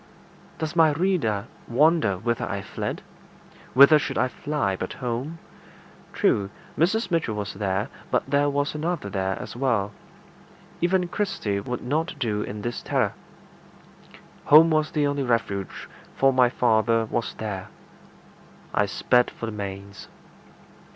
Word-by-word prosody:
Does 160 +1 -4
my 160 -3 +5
reader 145 - 0 0.2
wonder 140 - +3
whither 120 +4 -2
I 100 -1 -3
fled? - - -5 0.7
Whither 140 +3 +8
should 135 - -3
I 130 - +2
fly 145 -9 -2
but 95 - -5
home? 125 +6 -4 0.7
True, 100 -1 +1 0.3
Mrs. 195 +4 +1
Mitchell 160 -10 0
was 105 -2 -4
there, 95 0 -1 0.2
but - - +1
there 145 +1 +2
was 145 +1 -1
another 155 - -3
there 95 0 -1
as - - -7
well. 120 -6 0 0.9
Even 180 +1 +2
Kirsty 170 - -2
would 125 +5 -5
not 155 +6 -1
do 110 -6 -1
in 105 0 -5
this 120 0 -3
terror. - - 0 1.3
Home 160 +2 +7
was 155 0 +2
the 150 -2 0
only 145 0 0
refuge, 115 -6 -2 0.3
for 135 0 +4
my 125 -1 +5
father 115 -2 +2
was 115 +1 -3
there. 100 -4 -5 1.1
I 105 - +2
sped 125 +5 +2
for - - -7
the 115 - -4
manse. 100 -1 -7
125 Hz, 135 wpm, -25 LUFS, 105-150 Hz, 1.3 s, Whither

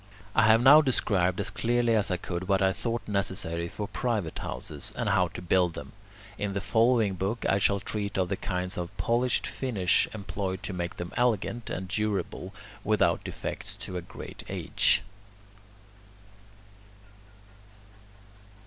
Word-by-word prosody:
I 115 -1 +5
have 110 +2 +6
now 145 +4 +9
described 95 - +1
as - - 0
clearly 115 +4 +1
as 105 -3 +2
I 90 - 0
could 90 +1 -5
what 95 -1 +3
I 95 0 +3
thought 115 +4 -3
necessary 95 -4 -1
for 105 +3 -5
private 110 -10 -2
houses, - - -4
and - - -1
how 90 -1 +3
to 85 - -9
build 90 -1 +2
them. - - -8 0.5
In 100 -1 -2
the 100 - -1
following 110 +1 +3
book 100 +5 -2
I 100 - +3
shall 100 0 +3
treat 100 0 -3
of 95 -1 +2
the 95 - -1
kinds 90 -1 -3
of 90 +3 -6
polished 120 +1 +1
finish 105 -9 +1
employed 100 -3 -4
to 100 - -3
make 85 -1 -4
them 85 0 -6
elegant, 120 -1 0
and 95 +1 -4
durable 100 -2 -2 0.3
without 105 0 +2
defects - - -5
to 90 - -7
a 90 - -2
great 85 - -9
age. - - +2
100 Hz, 150 wpm, -28 LUFS, 90-115 Hz, 0.5 s, now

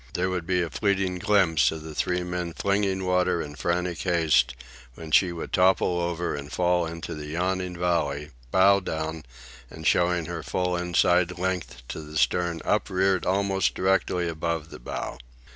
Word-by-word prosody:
There 95 +1 0
would 90 -2 -3
be 90 -1 +2
a 85 - -5
fleeting 100 -3 0
glimpse 85 -9 +3
of 80 -1 -6
the 80 -1 -8
three 90 +3 0
men 90 -1 -4
flinging 100 -1 0
water 90 -1 +2
in 75 -2 -5
frantic 85 +4 -1
haste, 80 -8 +2 0.4
when 80 -1 -9
she 90 +3 +5
would 85 -1 -7
topple 90 -1 +3
over 85 0 -2
and 70 0 -6
fall 90 -1 +1
into 85 0 -6
the 75 -1 -7
yawning 90 +2 -2
valley, 75 -4 -1 0.2
bow 100 +5 +5
down 80 -3 -4 0.4
and 80 0 -10
showing 85 +3 +2
her 85 -1 -5
full 90 +3 -1
inside 90 0 +2
length 90 -10 -3
to - - -5
the 75 0 -7
stern 85 +6 +1
upreared 95 -3 +1
almost 95 -1 +1
directly 90 -2 +1
above 80 -1 -3
the - - -9
bow. - - -5
90 Hz, 165 wpm, -26 LUFS, 80-90 Hz, 0.4 s, she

